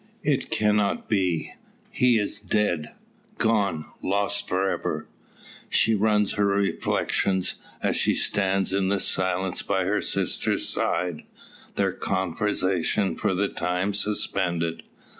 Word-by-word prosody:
"It - - 0
cannot 105 -1 +1
be; 90 -6 0 0.4
he 125 -2 +4
is 105 0 -1
dead 100 -6 0 0.5
gone 100 -8 +1 0.2
lost 100 +1 -1
for 95 +2 +1
ever!" - - -2 0.6
So 115 - +4
run 105 0 +3
her 100 +1 0
reflections, 100 -1 0 0.3
as - - +1
she - - +2
stands 95 -1 +1
in 95 -1 +1
silence 95 -1 0
by 95 - 0
her 100 +3 +1
sister's - - -1
side, 90 -4 -1 0.5
their - - +1
conversation 95 +1 0
for 95 - 0
the 100 +2 +1
time 90 +2 -1
suspended. 90 -5 0
95 Hz, 115 wpm, -25 LUFS, 90-105 Hz, 0.6 s, he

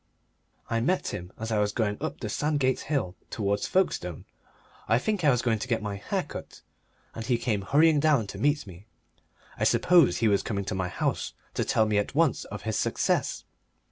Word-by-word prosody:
I 115 - 0
met 180 +11 0
him 90 +1 -6
as 110 +1 -4
I 110 - +2
was 105 0 +1
going 105 -2 -1
up - - -4
the - - -3
Sandgate 140 +2 0
Hill 135 -12 -2
towards 100 -1 -1
Folkestone 90 - 0 0.6
I 115 - +4
think 200 - -1
I 150 - +5
was 125 -3 +2
going 115 -3 +1
to 130 - -4
get 115 -3 +1
my 105 -2 -4
hair 100 - -2
cut, - - -9 0.5
and 115 - -6
he 120 0 +1
came 110 -4 -1
hurrying 150 +8 +4
down 145 -6 +3
to - - -8
meet 145 -1 +1
me 95 +2 -13 0.7
I - - 0
suppose 175 -7 +4
he 115 - +2
was 100 -2 +3
coming 100 -3 -3
to 105 - -3
my 95 -1 -1
house - - -2 0.2
to - - 0
tell 110 - +2
me 105 -1 +2
at 105 - -3
once 160 -5 +2
of 105 -1 -8
his 110 -1 -1
success. - - 0
115 Hz, 205 wpm, -27 LUFS, 105-145 Hz, 0.7 s, I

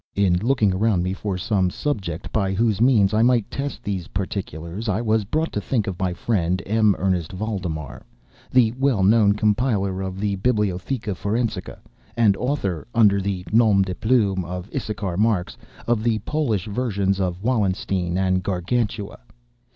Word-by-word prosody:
In 95 -3 +3
looking 110 -1 +2
around 100 -2 +1
me 90 +1 -1
for 95 -1 -3
some 95 0 +1
subject 95 - -3
by 95 -3 0
whose 110 +1 +1
means 110 -6 +4
I 110 - +3
might 120 -2 +2
test 140 +1 -4
these 95 -4 -3
particulars, 95 +1 -4
I 105 +1 +1
was 110 -2 +1
brought 155 +10 -1
to 105 - -1
think 110 0 -1
of 95 -3 -5
my 95 -1 0
friend, 90 -1 0
M. 110 -1 +3
Ernest 90 -3 -1
Valdemar, 90 - -4 0.5
the 120 -3 +4
well 135 -8 +2
known 105 0 +5
compiler 105 -3 0
of 95 0 -5
the 100 -1 -1
"Bibliotheca 105 +1 -1
Forensica," 110 +5 -2 0.4
and 110 -4 +4
author 100 - -2
(under 100 -4 +5
the 95 -2 -3
nom 110 -3 +4
de 95 -1 -4
plume 100 -4 +1
of 90 +3 -7
Issachar 100 -5 -3
Marx) 105 -4 +1 0.3
of 120 -2 +1
the 115 -1 +1
Polish 120 - 0
versions 100 -4 -1
of 90 0 -2
"Wallenstein" 95 -6 0
and 95 -1 +1
"Gargantua." 100 +3 -2
100 Hz, 160 wpm, -23 LUFS, 95-115 Hz, 0.5 s, known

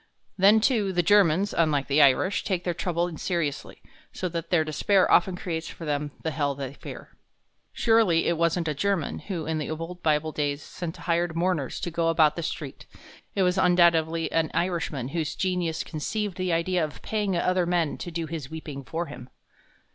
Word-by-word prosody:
Then, 200 +3 +6
too, 215 -5 +2
the 175 -1 +1
Germans, 195 0 +4
unlike 150 -4 +2
the 145 +2 +3
Irish, 145 +8 +3
take 180 -3 -1
their 175 - -1
trouble 175 0 -2
seriously, 170 -6 -3 0.3
so 185 - -3
that 165 -1 -5
their 165 -3 +3
despair 180 +5 +2
often 190 -4 +4
creates 165 -3 -4
for 165 - -9
them 145 0 -1
the 160 - -1
hell 145 -2 -1
they 135 -1 -5
fear. - - -10 0.6
Surely 225 -8 +3
it 170 - +2
wasn't 170 +1 +1
a 150 - 0
German 190 +1 -1
who 175 -6 -5
in 160 0 -1
the 150 - -4
old 165 +3 -6
Bible 155 0 +1
days 145 -1 -2
sent 175 -2 -6
hired 170 -1 -1
mourners 170 -5 -1
to 175 - -3
go 165 0 0
about 155 -2 +4
the 170 - -3
street; 150 -3 -6 0.5
it 195 - +2
was 180 +1 +2
undoubtedly 165 -3 +3
an 160 -1 +1
Irishman 165 -7 -1
whose 160 0 -2
genius 180 -4 -1
conceived 200 +5 -3
the 185 -1 -2
idea 170 +1 +1
of 150 -2 -6
paying 205 -4 -1
other 180 0 +1
men 170 -3 +1
to - - -5
do 170 -1 -3
his 155 -4 -6
weeping 150 -3 -7
for 165 +6 -3
him. 130 -5 -10
165 Hz, 185 wpm, -26 LUFS, 155-180 Hz, 0.6 s, Then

